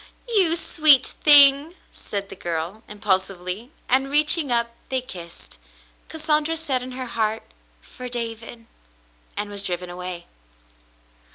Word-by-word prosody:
"You 385 -8 +2
sweet 310 -5 +4
thing!" 290 +2 +6 0.2
said 200 -1 -6
the - - -9
girl, 170 +5 -5
impulsively, 195 +1 -3 0.2
and, 270 +2 +2
reaching 300 0 +3
up, 235 -1 +3 0.2
they 260 - 0
kissed. 175 - -11 0.5
Cassandra 310 0 0
said 275 -6 -1
in 255 0 -8
her 255 0 -6
heart, 220 -2 -2 0.4
"For 250 -1 -10
David," 230 -1 -7 0.7
and 205 0 -3
was 200 -1 -2
driven 180 -2 -4
away. 180 -1 -7
240 Hz, 120 wpm, -22 LUFS, 195-290 Hz, 0.7 s, thing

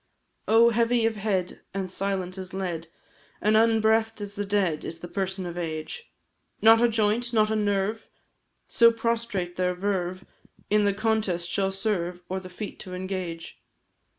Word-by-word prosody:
Oh! 230 +2 +6
heavy 235 0 +2
of 225 -1 +1
head, 195 -4 -2
and 190 -2 -3
silent 190 -1 -2
as 190 -1 -7
lead, 175 -4 -3 0.5
And 215 +1 +2
unbreathed 225 0 +3
as 205 -1 -6
the 205 0 -3
dead, 190 -6 +1
is 165 - -5
the 175 - -8
person 190 0 -3
of 175 0 -5
Age; 160 - -5 0.5
Not 225 +1 +7
a 240 - +5
joint, 225 +2 +1
not 215 -1 +3
a - - +1
nerve 205 +1 0 0.6
so 230 0 +6
prostrate 230 -6 -2
their 180 0 +1
verve 185 -1 -2 0.5
In 210 0 +4
the 200 - +3
contest 210 -5 0
shall 195 -1 +1
serve, 180 -3 -2
or 190 +1 -2
the 185 -1 -10
feat 200 +3 -7
to 180 -1 -7
engage. 180 -3 -5
200 Hz, 160 wpm, -26 LUFS, 180-220 Hz, 0.6 s, Not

